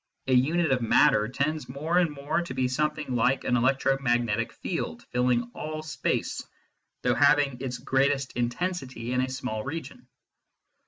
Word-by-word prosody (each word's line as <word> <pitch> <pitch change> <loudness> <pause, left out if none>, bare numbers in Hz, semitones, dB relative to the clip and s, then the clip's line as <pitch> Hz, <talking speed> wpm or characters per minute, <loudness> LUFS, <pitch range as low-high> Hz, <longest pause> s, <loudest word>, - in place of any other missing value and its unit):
A 130 - +1
unit 155 +5 +3
of 130 -2 +2
matter 110 -1 +4
tends 140 +2 -2
more 155 +7 0
and 175 -2 +3
more 145 +3 -2
to 150 -7 -6
be 130 -1 +1
something 150 +1 -1
like 125 +3 +2
an 125 - +1
electromagnetic 120 -3 +1
field - - -4
filling 125 -1 +1
all 155 0 -5
space, 155 - -2 0.6
though - - +3
having 145 -3 +3
its 125 -2 -3
greatest 135 0 +1
intensity 125 -1 -3
in 125 - +2
a 130 - -1
small 125 -4 -4
region. 140 -4 -7
130 Hz, 150 wpm, -27 LUFS, 125-150 Hz, 0.6 s, matter